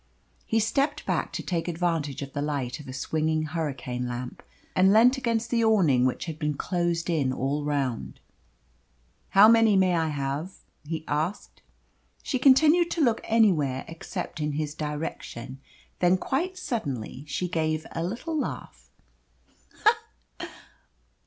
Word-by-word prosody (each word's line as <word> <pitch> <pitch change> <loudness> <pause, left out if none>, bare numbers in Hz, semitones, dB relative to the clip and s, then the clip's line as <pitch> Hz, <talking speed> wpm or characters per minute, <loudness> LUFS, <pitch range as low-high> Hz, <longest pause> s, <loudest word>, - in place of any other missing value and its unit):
He 225 - +2
stepped 275 +7 0
back - - -1
to - - -4
take 170 -2 -2
advantage 165 -5 -1
of 140 - -9
the 145 - -2
light 140 -4 -2
of 150 - -11
a - - -6
swinging 155 +4 -1
hurricane 140 -6 -3
lamp, 125 +1 -6 0.3
and 190 +1 +5
leant 235 +5 +6
against 230 -2 -1
the 230 -1 +2
awning 170 - +4
which 130 - -3
had 160 -2 -6
been 150 -2 -1
closed 170 +1 -1
in 150 -7 +1
all 140 +3 -1
round. 130 - -2 1.1
"How 200 +2 +7
many 225 -2 +5
may 185 -2 +3
I 165 -1 +1
have?" 145 +4 -3 0.3
he 160 0 -3
asked. 155 +7 -3 0.6
She 260 - -1
continued 310 +6 +5
to 335 - -1
look 235 -4 +2
anywhere 165 - +2
except 165 0 -6
in 150 -1 -1
his 150 0 -2
direction. 150 -4 -5 0.4
Then 180 +1 +4
quite 345 - -2
suddenly 145 - -4
she 180 +4 -2
gave 155 -2 -1
a 165 - -3
little 240 - -4
laugh. 60 - -5
160 Hz, 140 wpm, -26 LUFS, 145-220 Hz, 1.1 s, How